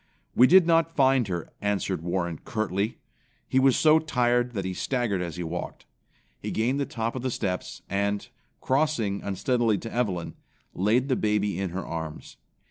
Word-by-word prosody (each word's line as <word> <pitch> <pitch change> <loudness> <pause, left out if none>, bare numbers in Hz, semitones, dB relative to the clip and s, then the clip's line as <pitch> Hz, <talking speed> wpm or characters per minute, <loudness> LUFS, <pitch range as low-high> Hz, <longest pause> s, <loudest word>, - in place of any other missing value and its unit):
"We 125 - +7
did 185 +2 +7
not 165 0 +2
find 135 -4 +4
her," 85 -3 -4
answered 100 -4 -1
Warren 85 -1 -2
curtly. 110 -1 -2 0.5
He 130 - +2
was 130 -1 +4
so 155 0 +6
tired 125 -5 +1
that 100 -4 -3
he 95 - -2
staggered 115 -3 -1
as 85 -3 -4
he 90 - -4
walked. 85 +1 -5 0.5
He - - -5
gained 125 +5 0
the 140 - -1
top 115 -4 -3
of 130 - -3
the 130 - -1
steps 95 -6 -3
and, 100 +1 -1 0.3
crossing 130 -8 0
unsteadily 115 +2 +1
to 115 +3 -7
Evelyn, 100 -8 -1 0.4
laid 115 +8 +2
the 130 - +2
baby 105 -4 0
in 95 -1 -1
her 90 +2 -5
arms. 80 -2 -6
110 Hz, 170 wpm, -26 LUFS, 95-130 Hz, 0.5 s, We